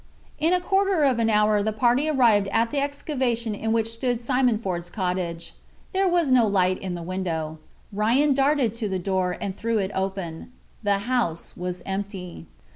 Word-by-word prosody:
In 320 Hz, +2 st, +2 dB
a 365 Hz, -, +3 dB
quarter 385 Hz, -2 st, +2 dB
of 260 Hz, -4 st, +3 dB
an 225 Hz, -1 st, +2 dB
hour 210 Hz, -1 st, +3 dB
the 220 Hz, +2 st, 0 dB
party 245 Hz, +7 st, +2 dB
arrived 230 Hz, -8 st, +4 dB
at 230 Hz, +3 st, +1 dB
the 285 Hz, -, 0 dB
excavation 260 Hz, -5 st, -1 dB
in 220 Hz, +2 st, -2 dB
which 225 Hz, -1 st, +1 dB
stood 245 Hz, 0 st, -1 dB
Simon 250 Hz, -1 st, +2 dB
Ford's 180 Hz, -5 st, -4 dB
cottage. 180 Hz, -3 st, -3 dB, 0.4 s
There 385 Hz, 0 st, +2 dB
was 345 Hz, -6 st, +2 dB
no 245 Hz, -3 st, +5 dB
light 185 Hz, -2 st, +2 dB
in 185 Hz, -2 st, -4 dB
the 170 Hz, -, -6 dB
window. 165 Hz, -4 st, -3 dB, 0.3 s
Ryan 240 Hz, +8 st, +3 dB
darted 270 Hz, -4 st, +2 dB
to 230 Hz, -3 st, -3 dB
the 190 Hz, -, -1 dB
door, 185 Hz, -1 st, -1 dB
and 195 Hz, -2 st, -4 dB
threw 230 Hz, +1 st, -1 dB
it 195 Hz, -1 st, -1 dB
open. 190 Hz, -2 st, -4 dB, 0.3 s
The 205 Hz, -2 st, +2 dB
house 235 Hz, -10 st, -1 dB
was 180 Hz, 0 st, -5 dB
empty. 190 Hz, -, -5 dB
215 Hz, 180 wpm, -24 LUFS, 185-255 Hz, 0.4 s, no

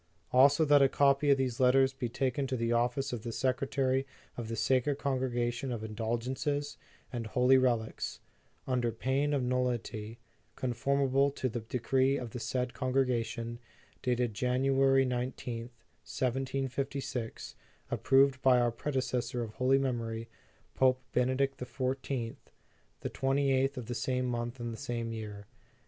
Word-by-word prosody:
"Also, 140 Hz, +4 st, +6 dB
that 145 Hz, -1 st, +6 dB
a 135 Hz, -, +6 dB
copy 140 Hz, +1 st, +3 dB
of 140 Hz, -, +6 dB
these 130 Hz, -3 st, -1 dB
letters 130 Hz, +1 st, +4 dB
be 130 Hz, -3 st, -3 dB
taken 135 Hz, +3 st, -1 dB
to 130 Hz, -1 st, -2 dB
the 115 Hz, 0 st, 0 dB
Office 125 Hz, +3 st, 0 dB
of 120 Hz, -, -3 dB
the 115 Hz, -, -5 dB
Secretary 130 Hz, +2 st, 0 dB, 0.3 s
of 120 Hz, -2 st, -5 dB
the 115 Hz, -, -3 dB
Sacred 130 Hz, +4 st, +1 dB
Congregation 130 Hz, -2 st, -1 dB
of 115 Hz, -3 st, -4 dB
Indulgences 120 Hz, +6 st, -2 dB, 0.4 s
and 115 Hz, -2 st, -3 dB
Holy 125 Hz, +4 st, +4 dB
Rel 125 Hz, -3 st, +4 dB
ics, 110 Hz, -, -6 dB, 0.5 s
under 125 Hz, -2 st, 0 dB
pain 135 Hz, +5 st, 0 dB
of 140 Hz, -3 st, +1 dB
nullity, 120 Hz, -3 st, -2 dB, 0.4 s
conformably 135 Hz, +2 st, +1 dB
to 130 Hz, -, -1 dB
the 120 Hz, -, -3 dB
decree 130 Hz, +4 st, +1 dB
of 120 Hz, -4 st, -6 dB
the 125 Hz, -, -5 dB
said 125 Hz, +1 st, -2 dB
Congregation, 125 Hz, -3 st, -1 dB, 0.4 s
dated 125 Hz, -2 st, 0 dB
Jan 125 Hz, +4 st, 0 dB
uary 135 Hz, 0 st, +4 dB
i 125 Hz, 0 st, 0 dB
Qth, 120 Hz, -2 st, -6 dB
1756, 130 Hz, +1 st, -4 dB, 0.4 s
approved 135 Hz, 0 st, +3 dB
by 130 Hz, -2 st, +5 dB
our 120 Hz, -1 st, +2 dB
predecessor 125 Hz, -1 st, -2 dB
of 110 Hz, -, -6 dB
holy 130 Hz, +4 st, +3 dB
memory, 115 Hz, -4 st, -2 dB, 0.5 s
Pope 130 Hz, -1 st, +3 dB
Benedict 130 Hz, +2 st, +1 dB
XIV, 130 Hz, -2 st, -3 dB, 0.6 s
the -, -, -3 dB
28th 135 Hz, 0 st, +1 dB
of 125 Hz, -, -4 dB
the 120 Hz, -, -4 dB
same 125 Hz, +1 st, -1 dB
month 120 Hz, 0 st, -3 dB
and 120 Hz, -1 st, -4 dB
the -, -, -7 dB
same 120 Hz, -3 st, -3 dB
year. 105 Hz, -2 st, -7 dB
125 Hz, 145 wpm, -31 LUFS, 120-135 Hz, 0.6 s, Also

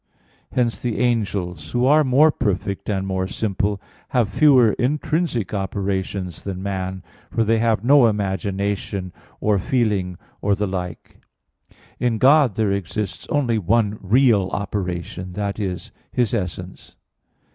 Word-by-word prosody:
Hence 120 Hz, -2 st, 0 dB
the 120 Hz, -3 st, -2 dB
angels, 95 Hz, -9 st, -1 dB
who 120 Hz, +1 st, +2 dB
are 150 Hz, +3 st, +5 dB
more 145 Hz, +4 st, +5 dB
perfect 100 Hz, -6 st, -2 dB
and 95 Hz, -2 st, -1 dB
more 95 Hz, -1 st, -1 dB
simple, 100 Hz, 0 st, -1 dB, 0.3 s
have 120 Hz, -5 st, +1 dB
fewer 130 Hz, -6 st, +6 dB
intrinsic 150 Hz, -, 0 dB
operations 95 Hz, -2 st, -3 dB
than 95 Hz, -1 st, -5 dB
man, 95 Hz, -1 st, -3 dB, 0.3 s
for 115 Hz, -, +1 dB
they 110 Hz, +1 st, +2 dB
have 110 Hz, -2 st, +1 dB
no 135 Hz, -1 st, +6 dB
imagination, 100 Hz, -2 st, -2 dB, 0.3 s
or 105 Hz, -2 st, +2 dB
feeling, 100 Hz, -6 st, 0 dB, 0.2 s
or 100 Hz, 0 st, +2 dB
the 105 Hz, +1 st, -1 dB
like. 90 Hz, -3 st, -6 dB, 0.8 s
In 120 Hz, -2 st, +1 dB
God 135 Hz, -2 st, +5 dB
there 110 Hz, -3 st, +1 dB
exists 100 Hz, +1 st, -3 dB
only 120 Hz, -6 st, +1 dB
one 105 Hz, +2 st, +1 dB
real 105 Hz, -2 st, +3 dB
operation 90 Hz, -2 st, -4 dB
that 100 Hz, +2 st, -3 dB
is, 95 Hz, -4 st, -4 dB, 0.2 s
His 120 Hz, -2 st, 0 dB
essence. 90 Hz, -3 st, -5 dB
100 Hz, 130 wpm, -22 LUFS, 95-120 Hz, 0.8 s, fewer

